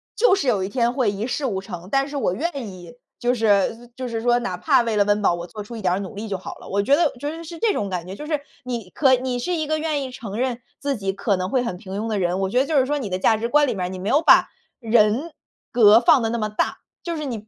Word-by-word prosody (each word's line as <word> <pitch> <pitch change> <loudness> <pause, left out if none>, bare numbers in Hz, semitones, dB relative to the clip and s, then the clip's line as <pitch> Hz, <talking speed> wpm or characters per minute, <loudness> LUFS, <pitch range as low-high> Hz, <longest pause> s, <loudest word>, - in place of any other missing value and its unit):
就 430 -4 +4
是 305 -8 -2
有 210 -6 +2
一 190 - -3
天 240 +1 +1
会 250 -5 +1
一 205 +2 -4
事 270 +3 -2
无 195 -6 -2
成。 185 -2 -8
但 275 0 +2
是 290 - -8
我 215 - 0
愿 280 - -3
意， 180 +1 -11 0.2
就 245 0 +1
是 225 +1 +1
就 255 0 -5
是 230 -2 -3
说 240 +1 +3
哪 190 -7 -3
怕 235 - +3
为 230 -2 -1
了 205 - +4
温 205 0 +1
饱， - - +4
我 170 0 -5
做 210 +2 -8
出 235 +3 -9
一 220 - -6
点 180 - +1
儿 195 - -2
努 195 +2 -7
力 215 +2 -6
就 195 -2 -2
好 185 - -8
了。 - - -12
我 200 +1 0
觉 275 +7 +4
得 320 -1 +2
觉 290 +3 -3
得 335 - -8
是 335 +1 -8
这 435 +2 +2
种 200 - -2
感 180 -2 -3
觉， 190 - -7
就 300 - -8
是 300 -2 0 0.2
你 235 -7 -5
可 265 -3 +4
你 250 0 -2
是 350 +8 -1
一 315 - -1
个 310 +1 -1
愿 305 -3 -1
意 260 - -6
承 220 -4 -7
认 250 -1 -1 0.2
自 280 -1 -1
己 195 -4 -2
可 200 0 0
能 185 +1 -3
会 255 -2 +1
很 235 -7 -3
平 195 +2 -6
庸 225 - -3
的 215 -2 -1
人， 180 0 0
我 190 - +1
觉 250 - +3
得 275 - +1
就 310 - +1
是 260 - +4
说 295 +1 -1
你 220 - -4
的 185 - -1
价 220 +3 +3
值 230 +2 -3
观 295 +1 +4
里 245 - 0
面， 185 -2 -3
你 190 - -6
没 185 +2 -5
有 285 +5 +4
把 - - +6 0.3
人 230 +6 +2 0.4
格 220 -1 +7
放 245 +1 +5
得 225 - 0
那 235 - -1
么 215 - -1
大， 215 - -1 0.2
就 335 -2 -4
是 300 - -4
你 225 -5 -5
235 Hz, 330 characters per minute, -22 LUFS, 200-275 Hz, 0.4 s, 格